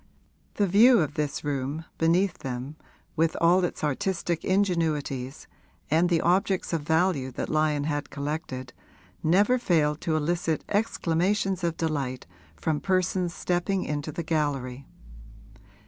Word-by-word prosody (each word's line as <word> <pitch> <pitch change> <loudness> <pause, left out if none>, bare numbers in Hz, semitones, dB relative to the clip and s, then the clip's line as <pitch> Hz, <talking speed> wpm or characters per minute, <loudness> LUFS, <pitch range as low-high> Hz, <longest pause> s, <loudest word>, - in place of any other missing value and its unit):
The 205 - +2
view 225 +6 +6
of 150 -3 0
this 150 -2 -2
room, 145 +2 -3
beneath 175 +3 +2
them, 130 +2 -5 0.4
with 165 0 +1
all 175 +2 +4
its 175 - -3
artistic 170 +2 -1
ingenuities 160 -8 -1 0.5
and 165 +3 +3
the 170 -2 +2
objects 190 +1 +1
of 165 - 0
value 160 -3 +1
that - - -4
Lyon 155 -2 +1
had 145 -1 -2
collected, 140 -3 -5 0.5
never 205 +10 +3
failed 155 -8 +1
to 160 - 0
elicit 165 0 -1
exclamations 195 -2 0
of 170 -1 -1
delight 140 -6 -2 0.3
from 150 - -1
persons 185 -1 0
stepping 180 +2 0
into 150 +1 -3
the 165 +3 -4
gallery. 140 -5 -2
160 Hz, 130 wpm, -26 LUFS, 145-180 Hz, 0.5 s, view